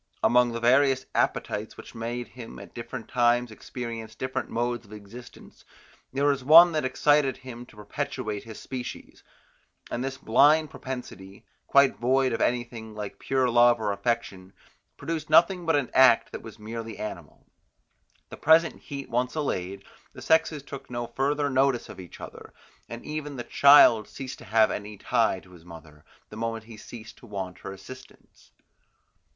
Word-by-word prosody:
Among 125 0 +4
the 115 - -4
various 130 +2 +3
appetites, 105 +1 -1
which - - -12
made 120 +1 -5
him 120 -2 -10
at - - -12
different 115 0 -7
times 120 -1 +2
experience 115 -1 -7
different 130 +2 -4
modes 120 0 -2
of 105 -1 -15
existence, 105 +4 -13 0.5
there 140 +2 0
was 140 -2 +1
one 165 +5 +9
that 155 -2 -1
excited 135 +1 +2
him 125 -1 -10
to - - -18
perpetuate 105 -1 -5
his 110 -2 -10
species; 125 -2 -8 0.7
and 125 - -2
this 135 0 -4
blind 150 +7 +4
propensity, 120 -7 -8 0.2
quite 140 -6 +4
void 130 +2 +2
of - - -2
anything 120 -3 -2
like 105 -2 -7
pure 130 -1 +1
love 120 0 +5
or 105 -2 -1
affection, 100 -3 -3 0.4
produced 160 -2 -4
nothing 170 +2 +4
but 165 - +3
an 140 -4 -1
act 130 -3 +5
that - - -7
was 110 -1 -11
merely 115 +1 -7
animal. 85 -8 -8 0.8
The - - -9
present 160 +2 +3
heat 140 -2 -7
once 125 +3 -1
allayed, 100 - -3 0.3
the - - -11
sexes 160 -2 +2
took 135 -1 -10
no 120 -1 -4
further 140 +4 -1
notice 135 -2 +1
of - - -10
each 90 -3 -11
other, - - -11 0.3
and 115 0 -8
even 150 -1 -5
the 120 - -5
child 140 -7 +6
ceased 135 -1 -8
to - - -12
have 110 0 +3
any 105 0 -6
tie 115 -3 +1
in 90 - -19
his 85 -3 -16
mother, 80 -3 -14 0.3
the 105 - -10
moment 115 0 -3
he 115 0 -12
ceased 110 +1 -11
to 120 - -15
want 95 -3 -6
her - - -7
assistance. 130 +7 -14
120 Hz, 165 wpm, -26 LUFS, 110-135 Hz, 0.8 s, one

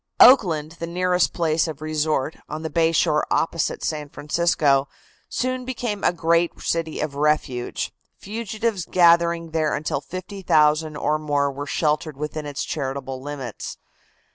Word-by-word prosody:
Oakland, 165 - +6
the 170 - -4
nearest 180 +1 +1
place 165 -1 +1
of 155 -3 -6
resort, 155 -1 -1
on 155 +1 -5
the 160 - -4
bay 165 +1 +3
shore 150 -2 +2
opposite 165 -1 0
San 150 -2 -3
Francisco, 145 -3 +1 0.4
soon 255 0 -2
became 240 -5 -4
a - - +4
great 170 0 +1
city 165 -1 -2
of 150 -2 -2
refuge, 145 -4 -1 0.2
fugitives 220 -1 -3
gathering 170 -2 +3
there 155 -2 +1
until 150 - -2
50,000 160 -5 +1
or 150 +1 0
more 145 -2 0
were 145 +1 -6
sheltered 150 -1 0
within 150 +1 -4
its 145 -1 -3
charitable 135 -2 -4
limits. 135 -5 -6
155 Hz, 140 wpm, -23 LUFS, 150-170 Hz, 0.4 s, Oakland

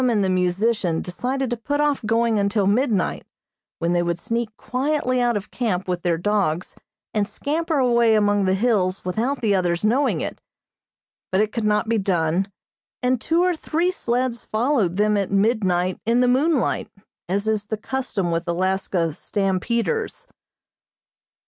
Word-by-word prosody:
and 215 -4 +2
the 190 - +1
musician 185 -1 +1
decided 250 +7 -3
to - - +1
put 290 +5 -2
off 295 -3 +1
going 225 0 +2
until 200 0 +1
midnight, 210 -1 +1 0.5
when 170 +1 0
they 175 - +2
would 170 0 -1
sneak 230 +3 -2
quietly 255 -1 0
out 240 -2 +2
of 205 - -7
camp 195 -7 -1
with 180 -1 -2
their 170 -1 +1
dogs 185 -3 -1 0.4
and 210 -1 0
scamper 315 +7 -1
away 235 -3 +4
among 205 -1 +2
the 190 0 +2
hills 195 -4 +1
without 235 +10 -1
the 215 -3 +2
others 180 0 0
knowing 260 +6 +2
it, - - -5 0.9
but 190 - +2
it 215 0 +1
could 230 -1 -2
not 210 +1 +1
be 225 -1 +1
done, 185 0 0 0.5
and 250 -1 +1
two 335 +2 +2
or 360 -1 +2
three 330 +3 0
sleds 245 -6 -1
followed 220 - 0
them 210 +1 +2
at 200 -2 -1
midnight 195 -3 +1
in 230 +2 +2
the 250 - +4
moonlight, 275 +3 +1 0.4
as 200 +3 0
is 215 -2 0
the 220 +1 -3
custom 220 -7 -2
with 165 +1 -2
Alaska 180 -1 0
"stampeders." 215 - -1
215 Hz, 160 wpm, -22 LUFS, 185-245 Hz, 0.9 s, away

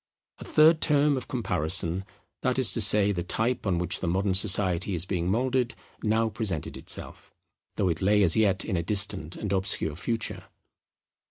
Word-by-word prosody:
A - - -9
third 155 +1 +3
term 145 -1 +2
of 130 - -6
comparison, 90 - -2 0.4
that 130 -1 -1
is 130 -4 +2
to 115 - +1
say 105 0 +6
the 90 -3 -3
type 110 +6 -2
on 90 -3 0
which 90 0 0
modern 95 +2 -1
society 95 -1 +3
is 85 +1 -1
being 90 -2 -3
moulded, 125 +2 -1 0.3
now 110 +1 0
presented 100 -7 -3
itself; - - -5 0.4
though 95 - -1
it 80 -2 -3
lay 105 +2 +2
as 85 -4 +3
yet 100 -3 +1
in 100 - -3
a 85 - -1
distant 95 -3 +1
and 105 -2 -4
obscure 95 -5 -1
future. 115 +6 -3
100 Hz, 170 wpm, -26 LUFS, 90-115 Hz, 0.4 s, say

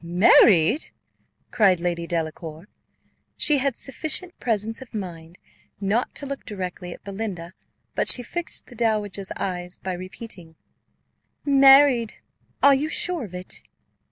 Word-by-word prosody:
"Married!" 180 - +5 0.6
cried 195 -6 +3
Lady 170 -1 -2
Delacour: 160 0 -5 0.7
she 295 -2 +3
had 265 -2 0
sufficient 315 +6 0
presence 225 0 -2
of 255 -3 -11
mind 170 -4 -7 0.4
not 205 +5 -1
to 285 - -5
look 275 0 -6
directly 180 -3 -6
at - - -11
Belinda; 195 -4 -6 0.4
but - - -1
she 245 - +6
fixed 345 +8 -5
the - - -15
dowager's 210 -4 -1
eyes, 180 -1 -4
by 185 - -5
repeating, 185 -2 -9 0.9
"Married! 270 -4 +6 0.5
Are 280 - +8
you 285 +3 0
sure 340 -4 -1
of 185 -3 -11
it?" 180 0 -5
205 Hz, 130 wpm, -23 LUFS, 180-265 Hz, 0.9 s, Are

